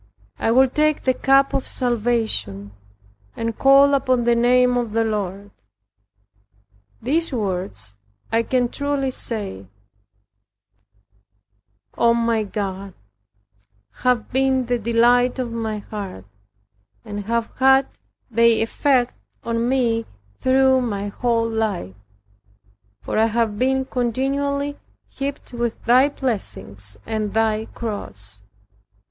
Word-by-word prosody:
I - - 0
will 260 +3 +5
take 305 +3 +1
the 260 - +3
cup 275 +1 +3
of 265 - -1
salvation, 225 - -1 0.6
and 230 -1 -3
call 275 +1 +6
upon 255 -3 +2
the 240 0 +3
name 250 +1 +4
of 235 -3 -1
the 225 0 +2
Lord." 205 -2 -3 1.5
These 320 +7 +1
words, 180 - -2 0.4
I 225 +1 +3
can 245 +1 0
truly 285 -1 -1
say, 200 - -4 2.3
O 235 0 +4
my 230 -1 +1
God, 195 -2 -5 1.0
have 250 -3 0
been 265 -1 +2
the 245 0 0
delight 240 +3 +3
of 250 -3 -3
my 225 -2 -3
heart, 200 - -7 0.8
and 205 -2 -6
have 230 +1 -1
had 265 0 +5 0.5
their 230 0 +4
effect 255 +1 +1 0.3
on 230 +1 -1
me, 235 -4 +1 0.3
through 260 0 +4
my 205 -4 -3
whole 230 +1 0
life; 215 - -2 1.1
for - - -1
I 220 - +5
have 225 -2 -1
been 265 +1 +1
continually 280 +4 -1 0.3
heaped 275 -2 -6
with 235 -1 -2
thy 255 +4 +5
blessings 100 - -4
and 215 -2 -3
thy 220 -1 +1
cross. 100 - -5
235 Hz, 110 wpm, -21 LUFS, 215-260 Hz, 2.3 s, call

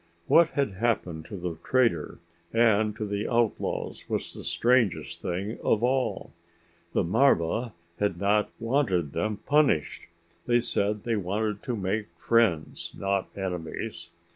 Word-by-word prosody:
What 170 - +6
had 140 -6 +2
happened 95 -6 -1
to 100 - -7
the 85 -3 -5
trader 130 -2 +1 0.3
and 110 -2 +3
to 110 - -3
the 100 +1 -2
outlaws 120 -2 -1
was - - -2
the - - -9
strangest 120 -5 +1
thing 100 +6 -3
of 110 - +2
all. 130 +1 0 0.6
The - - +2
marva 110 +2 +2 0.3
had 100 -4 0
not 105 +1 +2
wanted 115 - 0
them 105 0 -1
punished. 145 - +2 0.4
They 120 0 +4
said 105 -3 0
they 115 -2 0
wanted 105 +2 -2
to 125 -4 -3
make 105 +1 -2
friends, 110 -8 +1
not 100 -1 0
enemies. 90 0 -5
105 Hz, 135 wpm, -27 LUFS, 95-120 Hz, 0.6 s, What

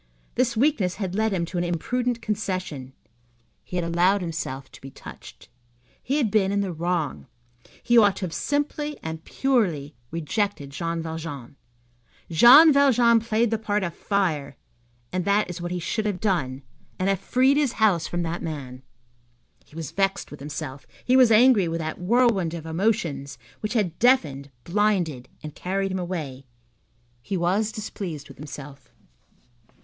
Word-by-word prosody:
This 245 -2 0
weakness 225 - +2
had 190 -4 -4
led 220 +2 +1
him 175 -3 0
to 175 +1 -4
an - - 0
imprudent 235 +8 -1
concession. 185 - -3 0.7
He - - -9
had 175 -2 0
allowed 180 +4 +2
himself 145 -6 -5
to - - -15
be 135 - -9
touched. - - -12 0.5
He 275 +4 -1
had 240 -9 +1
been 195 -2 +2
in 200 0 +1
the 190 -3 -2
wrong. 165 -4 -2 0.6
He 240 -1 +5
ought 205 -3 +4
to 190 - -3
have 165 - -6
simply 295 +1 -2
and 160 0 -5
purely 180 - 0 0.2
rejected 165 - -2
Jean 165 +3 -3
Valjean. 160 -6 -6 0.8
Jean 270 - +9
Valjean 245 -4 +5
played 225 0 0
the 225 - 0
part 210 -2 -1
of 170 -2 -3
fire, 160 -9 -1 0.6
and 185 0 0
that 200 +1 +2
is 180 0 -7
what 175 - -3
he 180 - -2
should 215 +5 -2
have 195 -3 -2
done, 145 -10 -1 0.3
and 185 - -1
have 195 -2 +1
freed 260 +7 +3
his 285 -5 +1
house 200 -7 +2
from 175 0 -2
that 170 +1 -3
man. 135 -5 -6 0.8
He - - -21
was 165 -4 -5
vexed 195 0 -1
with 145 - -9
himself, 145 -1 -7 0.2
he 250 - +3
was 255 -3 +7
angry 220 -4 +6
with 165 0 -2
that 160 -1 -4
whirlwind 200 -5 +2
of 165 -2 -7
emotions 160 - -1 0.2
which 210 +1 -3
had 195 -8 -1
deafened, 150 - +2
blinded, 175 -9 0
and 150 -1 -7
carried 195 +1 -2
him 190 - -2
away. 150 -8 -5 0.7
He 190 +10 -3
was 195 +5 +1
displeased 180 -9 -6
with - - -13
himself. 140 -2 -10
185 Hz, 165 wpm, -25 LUFS, 160-220 Hz, 0.8 s, Jean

